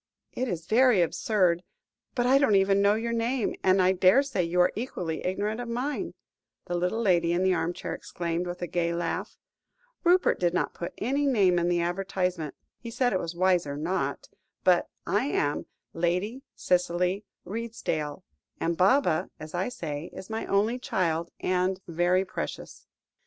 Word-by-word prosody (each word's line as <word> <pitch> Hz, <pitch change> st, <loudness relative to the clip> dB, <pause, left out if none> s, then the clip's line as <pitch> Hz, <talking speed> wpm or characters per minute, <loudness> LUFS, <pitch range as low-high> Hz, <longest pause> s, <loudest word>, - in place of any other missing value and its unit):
"It 255 Hz, -, -2 dB
is 170 Hz, -6 st, -4 dB
very 240 Hz, +1 st, +4 dB
absurd, 175 Hz, -1 st, +1 dB, 0.5 s
but 245 Hz, -2 st, +1 dB
I 265 Hz, +2 st, +5 dB
don't 250 Hz, -8 st, +4 dB
even 195 Hz, 0 st, +4 dB
know 200 Hz, +1 st, +4 dB
your 235 Hz, +1 st, -2 dB
name, 235 Hz, +1 st, 0 dB
and 190 Hz, +1 st, +4 dB
I 185 Hz, 0 st, +5 dB
daresay 190 Hz, +6 st, +3 dB
you 175 Hz, +1 st, -1 dB
are 180 Hz, -, +3 dB
equally 180 Hz, -9 st, -4 dB
ignorant 210 Hz, +5 st, -1 dB
of 240 Hz, -, -6 dB
mine?" 255 Hz, +5 st, -3 dB, 0.5 s
the 175 Hz, -, -4 dB
little 180 Hz, +5 st, 0 dB
lady 170 Hz, -5 st, +3 dB
in 180 Hz, +2 st, +1 dB
the 190 Hz, 0 st, +3 dB
armchair 170 Hz, 0 st, -2 dB
exclaimed, 170 Hz, 0 st, -3 dB
with 175 Hz, 0 st, -5 dB
a -, -, -2 dB
gay 170 Hz, 0 st, 0 dB
laugh. 175 Hz, -, -3 dB, 0.7 s
"Rupert 360 Hz, +1 st, +4 dB
did 175 Hz, -1 st, +1 dB
not -, -, 0 dB
put 170 Hz, -, -6 dB
any 275 Hz, +5 st, 0 dB
name 195 Hz, -9 st, +4 dB
in 175 Hz, +1 st, +1 dB
the 175 Hz, -1 st, +2 dB
advertisement; 180 Hz, -3 st, -2 dB, 0.2 s
he 235 Hz, -, -7 dB
said 245 Hz, +2 st, +1 dB
it 185 Hz, -, +1 dB
was 170 Hz, 0 st, -5 dB
wiser 175 Hz, -5 st, +1 dB
not 175 Hz, +6 st, -2 dB, 0.4 s
but -, -, +3 dB, 0.2 s
I -, -, +1 dB
am 145 Hz, -, -1 dB, 0.3 s
Lady 180 Hz, +9 st, -1 dB
Cicely 180 Hz, +2 st, +1 dB, 0.2 s
Redesdale, 190 Hz, -9 st, -3 dB, 0.4 s
and 170 Hz, +1 st, 0 dB
Baba, 185 Hz, -, +3 dB
as 155 Hz, 0 st, -9 dB
I 180 Hz, +6 st, -1 dB
say, 160 Hz, -8 st, -5 dB
is 190 Hz, +3 st, -9 dB
my 220 Hz, -, -3 dB
only 215 Hz, +5 st, +1 dB
child, 170 Hz, -7 st, -1 dB
and 185 Hz, +1 st, +1 dB
very 175 Hz, +3 st, +2 dB
precious." -, -, -6 dB
185 Hz, 165 wpm, -27 LUFS, 175-220 Hz, 0.7 s, I